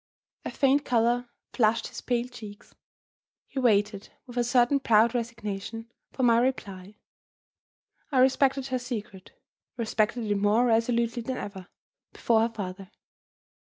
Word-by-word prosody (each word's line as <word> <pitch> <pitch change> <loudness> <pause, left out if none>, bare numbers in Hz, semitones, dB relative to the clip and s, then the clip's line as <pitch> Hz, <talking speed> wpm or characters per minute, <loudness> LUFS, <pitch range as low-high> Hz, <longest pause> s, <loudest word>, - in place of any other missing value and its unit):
A - - -4
faint 280 +1 +2
color 240 0 +1 0.2
flushed 225 -1 +1
his - - -8
pale 245 -1 -1
cheeks. 215 -5 -12 0.7
He 270 - -5
waited, 210 -4 +1 0.2
with 245 -2 -12
a 245 - +1
certain 245 +3 +3
proud 230 -2 +4
resignation, 225 -1 -5 0.2
for 260 - -3
my 235 -1 +5
reply. 205 -6 -3 1.2
I 270 - 0
respected 265 +1 +3
her 255 -1 -1
secret, 225 - -7 0.4
respected 225 0 0
it 205 -1 0
more 205 +4 +3
resolutely 235 0 +1
than 255 +2 -4
ever, 190 -3 -7 0.5
before 225 -2 +2
her 230 - +2
father. 195 -3 -7
230 Hz, 130 wpm, -27 LUFS, 210-250 Hz, 1.2 s, my